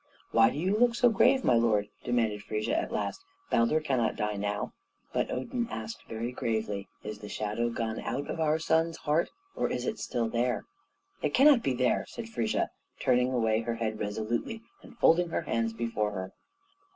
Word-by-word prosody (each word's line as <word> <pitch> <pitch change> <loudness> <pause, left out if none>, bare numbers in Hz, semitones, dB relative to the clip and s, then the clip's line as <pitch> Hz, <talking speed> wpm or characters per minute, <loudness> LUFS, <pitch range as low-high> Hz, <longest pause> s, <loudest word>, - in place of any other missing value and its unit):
"Why 115 0 +6
do 135 - -5
you 185 +6 +1
look 235 +1 +4
so 240 +1 +5
grave, 260 +5 +4
my - - +4
lord?" 115 -3 +3 0.2
demanded 115 -4 +1
Frigga 105 +1 -2
at - - -1
last. 385 - -2 0.3
"Baldur 115 +7 +3
cannot 130 -7 +1
die 105 0 -1
now." 105 +1 -2 0.4
But - - 0
Odin 235 - -2
asked 230 - -6
very 115 +2 -3
gravely, 110 -5 -2 0.2
"Is 105 -1 -6
the 105 - -8
shadow 110 +3 -1
gone 115 -1 -2
out 130 +5 -3
of - - -4
our 155 -1 +3
son's 165 +1 +1
heart, 150 +3 +1 0.3
or - - 0
is 125 - -2
it - - -2
still 115 -1 -1
there?" 120 +2 0 0.6
"It 150 - 0
cannot 275 -2 +7
be 135 - 0
there," 125 0 +1
said 230 -1 -7
Frigga, 115 - 0 0.3
turning 125 +1 +3
away 110 -3 +2
her 115 0 -2
head 110 -2 -2
resolutely, 110 - -2 0.2
and - - -15
folding 175 -2 +4
her 170 - -1
hands 115 -7 0
before 110 -2 -1
her. 95 -1 -5
120 Hz, 185 wpm, -29 LUFS, 110-160 Hz, 0.6 s, cannot